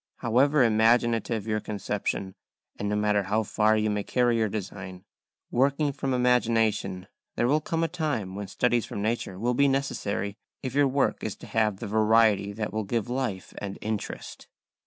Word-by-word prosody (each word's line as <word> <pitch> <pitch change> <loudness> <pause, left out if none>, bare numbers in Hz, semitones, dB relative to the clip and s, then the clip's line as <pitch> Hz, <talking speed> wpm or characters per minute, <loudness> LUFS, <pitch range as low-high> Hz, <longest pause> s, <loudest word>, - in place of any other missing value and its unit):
However 130 +4 +3
imaginative 115 -1 +2
your 110 -1 0
conception, 100 -2 -3 0.4
and 100 - -3
no 105 - 0
matter 105 0 +2
how 105 +3 0
far 110 +1 +2
you 110 0 +1
may 105 0 -1
carry 120 +1 +2
your 110 -1 +1
design, 95 -2 -6 0.5
working 140 +3 +2
from 135 0 -3
imagination, 115 -6 +1 0.3
there 120 - +1
will 150 +4 +3
come 165 +2 -1
a - - +2
time 150 - -2
when 100 0 -5
studies 120 +3 +1
from 100 - -4
nature 110 -4 -2
will 120 +5 0
be 140 +3 +4
necessary 105 -7 -1 0.3
if 130 -2 -3
your 145 0 +4
work 135 +1 0
is - - -3
to - - -12
have 110 -3 +1
the - - -6
variety 110 -1 +3
that 105 +1 -4
will 110 0 -1
give 115 +2 -2
life 125 -7 -3
and 100 -1 -5
interest. 110 -1 -5
110 Hz, 175 wpm, -27 LUFS, 105-125 Hz, 0.5 s, be